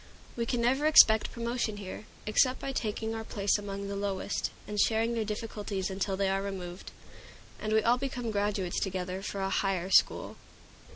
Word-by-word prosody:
We 235 -1 -2
can 245 -1 0
never 265 +5 +2
expect 220 -8 +7
promotion 235 -2 -2
here, 200 +1 -8 0.2
except 255 +4 +3
by 275 - -3
taking 220 -2 -2
our 225 0 -4
place 205 -1 0
among 200 -1 -5
the 200 - -4
lowest, 200 0 -2 0.2
and 210 0 -3
sharing 225 +2 +2
their 230 -1 0
difficulties 210 -3 -4
until 190 0 -2
they 195 0 +1
are 195 0 +1
removed, 185 -2 -6 0.7
and 215 - -3
we 220 0 +3
all 240 +2 +3
become 250 -4 -3
graduates 200 -3 -1
together 185 -1 -3
for 195 0 -4
a 195 0 -1
higher 195 -2 0
school. - - +3
210 Hz, 175 wpm, -30 LUFS, 195-230 Hz, 0.7 s, expect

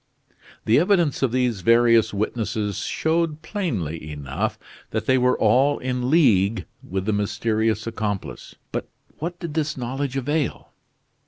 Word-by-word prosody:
The 115 +5 +5
evidence 175 -4 +2
of 135 -4 +2
these 125 -5 0
various 115 +2 +5
witnesses 105 -1 -2
showed 160 +3 -1
plainly 100 - -3
enough 70 -2 -3 0.3
that - - -2
they 130 - +4
were 125 0 +3
all 130 +7 +3
in 125 -1 -2
league 115 - +3 0.2
with 95 0 -4
the 110 - +1
mysterious 110 +1 0
accomplice; 105 -4 -4 0.2
but - - -4 0.3
what 170 +3 -4
did 170 -4 -5
this 155 -1 -1
knowledge 130 +2 -3
avail? 145 +2 -2
120 Hz, 135 wpm, -23 LUFS, 105-145 Hz, 0.3 s, The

